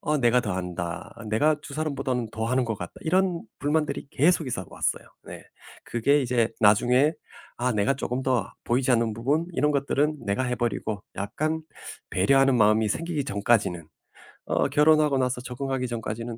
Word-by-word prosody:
어 150 -1 0
"내가 125 0 +4
더 105 -5 -3
한다. 90 -2 -5
내가 150 +8 +2
2 150 -2 -10
사람보다는 135 -6 -2
더 110 0 -3
하는 130 +1 +1
것 115 -2 -2
같다." - - -6
이런 180 +1 +1 0.2
불만들이 150 0 -1
계속 160 +1 +2
있어 95 -8 -4
왔어요. - - -2 0.2
네. - - -9 0.4
그게 140 +5 +2
이제 120 -2 +1
나중에 125 +8 +4 0.4
아 125 +1 0
내가 105 +6 +1
쪼끔 130 -1 -3
더 130 -2 0
보이지 125 +2 +1
않는 115 -2 +1
부분 145 +9 0
이런 150 0 +1
것들은 145 +2 0
내가 100 +6 0
해버리고 115 -4 -2
약간 155 +11 -2 0.5
배려하는 135 +7 +3
마음이 110 0 +4
생기기 160 +4 -2
전까지는 100 - 0 0.6
어 - - +1
결혼하고 150 -2 +4
나서 125 -1 0
적응하기 130 0 -3
전까지는 115 0 -5
125 Hz, 350 characters per minute, -26 LUFS, 110-145 Hz, 0.6 s, 내가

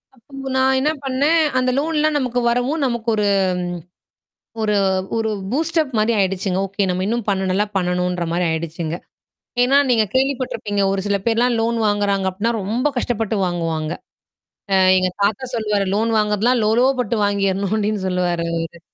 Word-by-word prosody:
அப்ப 270 +2 -9
நான் 265 0 +3
என்ன 300 +3 +1
பண்ணேன், 280 +5 +2 0.2
அந்த 255 0 +2
லோன்லாம் 310 0 +1
நமக்கு 250 -2 -1
வரவும். 250 +6 0
நமக்கு 235 -2 -2
ஒரு 210 -1 +1 1.3
ஒரு 210 -1 +1 0.4
ஒரு 225 -1 0 0.2
பூஸ்டப் 315 +1 0
மாரி 215 +2 +2
ஆயிடுச்சுங்க. 190 -1 0
ஓகே, 200 +1 -2
நம்ம 180 +1 -1
இன்னும் 230 +1 -1
பண்ண 190 -1 0
நல்லா 195 +3 +1
பண்ணணுன்ற 180 -1 -1
மாரி 175 +1 0
ஆயிடுச்சுங்க. 160 0 -3 0.7
ஏன்னா, 270 +3 +4
நீங்க 230 -3 +4
கேள்விப்பட்டருப்பீங்க. 255 -6 -1
ஒரு 195 0 -1
சில 200 0 +1
பேர்லாம் 235 +1 +2
லோன் 230 +1 0
வாங்குறாங்க 200 -2 +1
அப்டின்னா 205 +5 -1
ரொம்ப 225 +8 0
கஷ்டப்பட்டு 225 -3 -1
வாங்குவாங்க. 165 -3 -2 0.8
அ - - +5 0.2
எங்க 185 0 +1
தாத்தா 210 +5 0
சொல்லுவாரு. 210 -3 0
லோன் 225 +2 +1
வாங்குறதலாம் 215 +3 +2
லோலோ 225 +4 +3 0.2
பட்டு 235 -1 -2
வாங்கிறணும் 200 -1 0
அப்ப்டின்னு 210 -2 -1
சொல்லுவாரு 175 -2 0
அவரு 165 0 -4
210 Hz, 150 wpm, -20 LUFS, 190-245 Hz, 1.3 s, அ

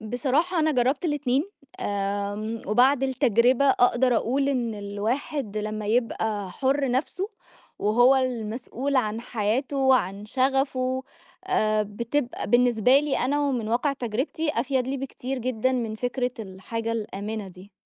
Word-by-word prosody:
بصراحة، 265 - 0
أنا 310 0 +3
جرَّبت 265 +4 +1
الاتنين، 290 -3 +1 0.4
آمم، 205 +2 -2
وبعد 255 +6 +4
التجربة 255 -1 +3
أقدَر 245 0 +3
أقول 275 +5 +1
إن 245 -5 -1
الواحد 215 +4 -3
لمَّا 215 0 -4
يبقى 220 -3 0
حُرّ 270 +6 0
نفسه 310 +10 -1 0.5
وهو 245 +5 +4
المسؤول 250 +2 -2
عن 220 -3 0
حياته 240 +5 -1
وعن 215 -7 +2
شغَفه، 260 0 0 0.4
آآ، 215 0 +2
بتبقى 235 +6 -3
بالنسبة 245 +1 +5
لي 295 -2 -1
أنا، 285 +4 +1
ومن 240 -5 -2
واقع 245 +5 +1
تجربتي، 265 +6 -2
أفيَد 255 +1 0
لي 275 - -1
بكتير 265 0 -5
جدًا 255 0 0
من 230 -4 -2
فكرة 245 +2 -2
الحاجة 220 +3 -4
الآمِنة 210 -1 -4
دي. 185 +2 -14
245 Hz, 130 wpm, -25 LUFS, 215-270 Hz, 0.5 s, بالنسبة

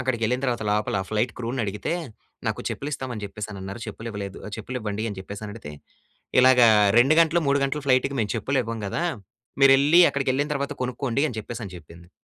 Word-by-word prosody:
అక్కడికెళ్ళిన 125 -1 0
తర్వాత 120 -3 -1
లోపల 105 0 0
ఆ - - -9
ఫ్లైట్ 110 +3 0
క్రూని 125 +1 -3
అడిగితే, 100 - -3 0.6
"నాకు - - -2
చెప్పులు 145 - -5
ఇస్తామని 125 -6 -5
చెప్పేసి 105 +1 -6
అనన్నారు. 100 +3 -7
చెప్పులు 115 +1 -7
ఇవ్వలేదు. 100 -2 -6
ఆహ్, 105 - -8
చెప్పులు 125 +4 -5
ఇవ్వండి." 105 +1 -3
అని 100 - -7
చెప్పేసి 100 +2 -8
అని 105 - -7
అడిగితే, 75 -10 -9 0.7
"ఇలాగ 130 0 +6 0.4
2 135 +6 +5
గంటలు, 165 +1 +3
3 140 0 +3
గంటలు 140 +1 -2
ఫ్లైట్‌కి 130 +1 +2
మేము 105 - -1
చెప్పులు 135 +3 0
ఇవ్వం 115 -1 -5
కదా! 160 - -2 0.6
మీరెళ్ళి, 140 +5 +7
అక్కడికెళ్ళిన 140 +1 0
తర్వాత 140 +1 -2
కొనుక్కోండి" 125 +2 -1
అని 115 - -6
చెప్పేసి 115 +2 -7
అని 90 - -10
చెప్పింది. 85 +1 -15
120 Hz, 190 wpm, -24 LUFS, 105-135 Hz, 0.7 s, మీరెళ్ళి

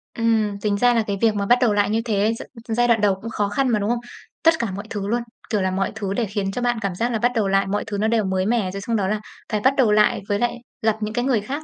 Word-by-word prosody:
Ừm, 220 -3 +1
tính 205 -1 0
ra 245 +3 +4
là 230 -2 +2
cái 200 - -1
việc 220 -2 +3
mà 200 - -1
bắt 245 +4 +5
đầu 235 -4 +3
lại 205 0 +2
như 225 +1 +1
thế 215 -1 +1 0.3
gi 225 - -2
giai 240 +2 +3
đoạn 230 -3 +3
đầu 200 -2 +3
cũng 230 - -5
khó 205 -3 -1
khăn 270 +6 0
mà, 220 -3 +2
đúng 205 +2 -1
không? 240 - +1 0.4
Tất 330 0 +6
cả 235 - 0
mọi 200 +3 -6
thứ 200 -2 -4
luôn, 235 +3 0 0.3
kiểu 210 -4 +1
là, 185 0 0
mọi 195 +1 -1
thứ 200 -3 -3
để 230 +3 0
khiến 200 -1 -2
cho 245 - -4
bạn 240 -1 +1
cảm 200 -4 -2
giác 235 +6 -1
là 225 - -1
bắt 245 +3 +2
đầu 215 -3 +1
lại, 195 0 +2
mọi 205 +2 -1
thứ 205 -2 -3
nó 215 +2 +1
đều 225 -1 +2
mới 190 0 0
mẻ, 215 -4 +1
rồi 195 +1 -6
xong 230 +3 -2
đó 200 -3 +1
là 210 +2 -1 0.3
phải 215 - +1
bắt 265 +5 +4
đầu 245 -6 +4
lại, 210 0 +3
với 205 0 +1
lại 240 0 0 0.3
gặp 220 -1 +2
những 215 0 -3
cái 245 +2 0
người 250 -6 +2
khác, 275 +9 -5
215 Hz, 320 wpm, -22 LUFS, 200-235 Hz, 0.4 s, Tất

